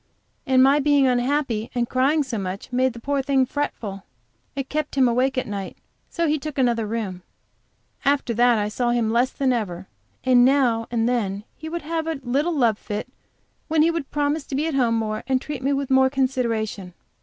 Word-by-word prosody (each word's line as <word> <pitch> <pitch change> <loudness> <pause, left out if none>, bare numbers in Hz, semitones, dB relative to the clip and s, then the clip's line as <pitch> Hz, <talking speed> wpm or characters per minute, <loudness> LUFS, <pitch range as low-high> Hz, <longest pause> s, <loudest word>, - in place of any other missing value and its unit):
And 260 -1 +5
my 275 +2 +5
being 285 -1 +3
unhappy 250 -2 0
and 240 -1 0
crying 275 +5 +2
so 250 -5 -4
much, 195 +5 -6
made 255 0 +2
the 235 - -9
poor 280 +3 -1
thing 270 -1 +2
fretful; 230 -8 -4 0.5
it 275 -1 -3
kept 305 -1 -3
him 265 -2 +4
awake 255 +3 +1
at 255 - 0
night, 200 -2 -6 0.3
so 335 -1 -1
he 305 0 +1
took 305 0 -6
another 235 -4 +1
room. 205 -5 -4 0.8
After 275 -3 +1
that 240 +1 +4
I 210 -1 0
saw 240 +3 -1
him 235 -2 +1
less 240 +3 +2
than 265 -2 +1
ever, 190 -5 -3 0.4
though 260 - +3
now 245 -2 +4
and 230 -1 0
then 205 -5 -1
he 315 - -8
would 340 0 -4
have 325 +1 -2
a 320 -3 -2
little 285 +7 0
love 230 -6 +2
fit, 210 +4 -5 0.6
when 315 -1 +3
he 330 - +3
would 330 -5 -4
promise 295 +1 0
to 270 - -5
be 295 +3 0
at 325 - -2
home 245 -4 +2
more 215 -1 -2
and 260 -1 +2
treat 285 -1 -6
me 275 +2 0
with 275 -1 -1
more 265 0 +5
consideration. 230 -8 -2
255 Hz, 200 wpm, -23 LUFS, 230-280 Hz, 0.8 s, And